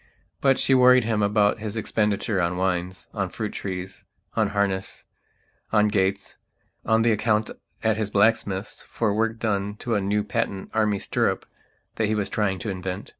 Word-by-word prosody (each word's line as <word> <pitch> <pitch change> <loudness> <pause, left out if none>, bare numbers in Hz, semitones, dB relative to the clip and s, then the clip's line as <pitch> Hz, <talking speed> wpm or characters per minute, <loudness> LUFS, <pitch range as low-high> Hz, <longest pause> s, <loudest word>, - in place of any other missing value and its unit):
But 135 -1 +3
she 135 - +2
worried 125 -1 +6
him 110 -1 0
about 105 0 +2
his 110 0 -5
expenditure 105 -2 0
on 85 +1 0
wines, 90 0 -2
on 95 -4 -2
fruit 105 +2 -4
trees, 95 -1 -6 0.3
on - - +2
harness, 100 -2 -2 0.7
on 105 -1 +4
gates, 100 -1 -1 0.4
on 110 0 +3
the 115 - +4
account 110 0 +1 0.3
at 110 -1 +2
his 110 -2 -1
blacksmith's 100 -1 +1
for 110 -3 -1
work 115 +1 0
done 105 -2 -1
to 120 +2 -3
a 105 - +2
new 105 +2 0
patent 105 -3 -3
Army 105 -2 +2
stirrup - - -1 0.5
that 110 - +1
he 110 - 0
was 100 -2 -1
trying 100 -2 0
to 90 - -5
invent. 95 +1 -5
105 Hz, 170 wpm, -24 LUFS, 95-110 Hz, 0.7 s, worried